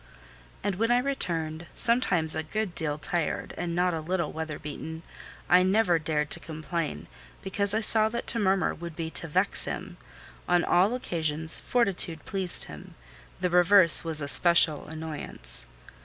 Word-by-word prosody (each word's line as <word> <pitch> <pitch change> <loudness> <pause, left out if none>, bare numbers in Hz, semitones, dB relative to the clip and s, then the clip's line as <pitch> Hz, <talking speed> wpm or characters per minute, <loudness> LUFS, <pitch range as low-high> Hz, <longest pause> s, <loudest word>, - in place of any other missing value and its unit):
And 200 -3 -2
when 225 +3 0
I 240 - +3
returned, 170 - -3
sometimes 185 -10 +3
a - - -2
good 200 +4 -4
deal 150 -3 -3
tired, 155 +2 -4
and 170 -1 -4
not 180 0 0
a 160 - -4
little 175 +2 -3
weather 160 -2 -6
beaten, 160 +2 -8 0.4
I 180 +2 +5
never 185 -2 +2
dared 150 -1 -3
complain, 155 - -4 0.4
because 200 +1 -1
I 220 - 0
saw 220 0 +5
that 235 +1 -5
to 230 - -1
murmur 195 -2 0
would 170 -1 -9
be 160 -1 -5
to 165 - -2
vex 150 - +3
him: - - -7 0.5
on 175 -1 +2
all 190 +7 +2
occasions 160 -7 +1
fortitude 190 -9 -1
pleased 190 -3 -1
him; - - -12 0.4
the 180 -1 -2
reverse 180 -1 +6
was 160 -2 +2
a 145 - -4
special 165 +1 +5
annoyance. 150 - -6
170 Hz, 155 wpm, -26 LUFS, 160-195 Hz, 0.5 s, reverse